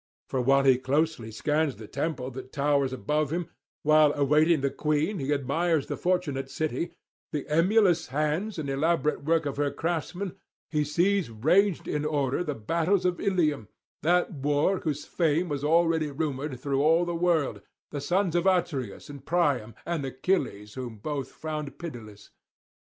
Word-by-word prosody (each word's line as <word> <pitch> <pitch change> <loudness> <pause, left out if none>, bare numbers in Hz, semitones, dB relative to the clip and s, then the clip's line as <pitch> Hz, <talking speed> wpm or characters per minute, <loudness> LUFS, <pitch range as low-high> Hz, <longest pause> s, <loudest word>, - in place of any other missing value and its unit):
For 130 - 0
while 135 +2 +4
he 130 -2 +5
closely 145 -2 0
scans 150 +5 0
the 110 - -10
temple 140 -2 -3
that 130 +1 -9
towers 140 -2 +1
above 145 +5 -1
him, 170 0 -3 0.3
while, 155 0 +5
awaiting 150 +2 +3
the 140 0 0
queen, 155 +6 0
he 135 +1 -2
admires 145 +3 +1
the - - -4
fortunate 175 -7 -1
city, 155 +2 -3 0.4
the 150 -3 -3
emulous 175 +2 +3
hands 155 - -1
and 155 -3 -3
elaborate 150 +2 0
work 160 +1 +2
of 140 -1 -3
her 145 0 +1
craftsmen, 175 +4 -3 0.4
he 150 -2 +2
sees 175 +3 +1
ranged 170 - +2
in 150 0 -1
order 145 0 0
the 150 -5 -3
[457 165 - -1
491]battles - - -8
of 180 -1 0
Ilium, 155 - +1 0.3
that 175 +3 +2
war 145 +6 +1
whose 150 -2 -3
fame 165 +1 +1
was 145 -3 -3
already 165 0 +3
rumoured 140 -2 -3
through 140 +1 0
all 165 +4 +4
the 175 - -2
world, 165 -4 +1 0.3
the 145 - -4
sons 175 +3 +1
of 175 +2 +2
Atreus 170 -8 0
and 140 -2 -10
Priam, 140 -10 0
and 170 -4 -2
Achilles 130 - -1
whom 125 -4 -6
both 135 +4 -4
found 150 -3 -5
pitiless. 115 -11 -9
150 Hz, 160 wpm, -27 LUFS, 135-170 Hz, 0.4 s, he